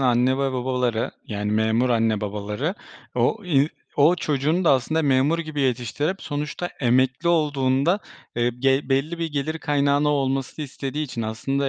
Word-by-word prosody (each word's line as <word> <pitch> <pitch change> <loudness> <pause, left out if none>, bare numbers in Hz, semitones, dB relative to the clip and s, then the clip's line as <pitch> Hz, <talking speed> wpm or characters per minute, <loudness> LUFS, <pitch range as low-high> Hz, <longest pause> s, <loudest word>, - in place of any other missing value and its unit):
anne 125 0 +3
ve 135 -1 0
babaları, 125 -2 -1
yani 105 0 -3
memur 110 +3 +2
anne, 115 -2 +2
babaları, 105 - -3 0.4
o 215 -2 +1
i 150 -4 +3 0.3
o 150 +5 +5
çocuğunu 155 +4 0
da - - +5
aslında 155 +5 +1
memur 140 +4 +3
gibi 155 -3 -3
yetiştirip 135 - -1
sonuçta 150 +4 -3
emekli 130 +6 +2
olduğunda, 145 +1 +2 0.4
eee, 120 0 +2
gel 135 +1 +2
belli 140 +5 0
bir 165 - -1
gelir 150 +3 -2
kaynağını 145 -1 +2
olmasını 135 +1 -1
istediği 140 +2 -4
için 120 -4 -5
aslında 135 +6 -1
135 Hz, 150 wpm, -23 LUFS, 125-150 Hz, 0.4 s, o